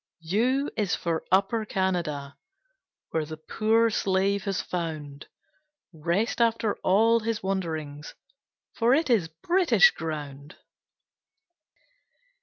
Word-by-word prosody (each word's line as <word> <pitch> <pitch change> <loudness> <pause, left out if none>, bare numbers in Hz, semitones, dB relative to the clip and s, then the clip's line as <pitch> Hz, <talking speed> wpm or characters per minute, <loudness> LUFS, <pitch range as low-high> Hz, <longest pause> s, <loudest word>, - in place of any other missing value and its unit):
U 185 +8 0 0.2
U - - -5
is 205 -4 0
for 165 -2 -2
Upper 195 +4 +2
Canada, 170 -9 -2 0.8
Where 160 - 0
the 155 +1 -7
poor 225 +7 +1
slave 195 0 0
has 195 -2 -1
found 155 -5 -5 0.7
Rest 170 +10 -1
after 230 -2 +2
all 225 +5 +3
his 225 -2 -3
wanderings, 160 -6 -4 0.6
For 240 +3 +3
it 310 -3 +1
is 200 -9 +3
British 350 - +3
ground! 145 -2 -7
190 Hz, 105 wpm, -26 LUFS, 160-225 Hz, 0.8 s, all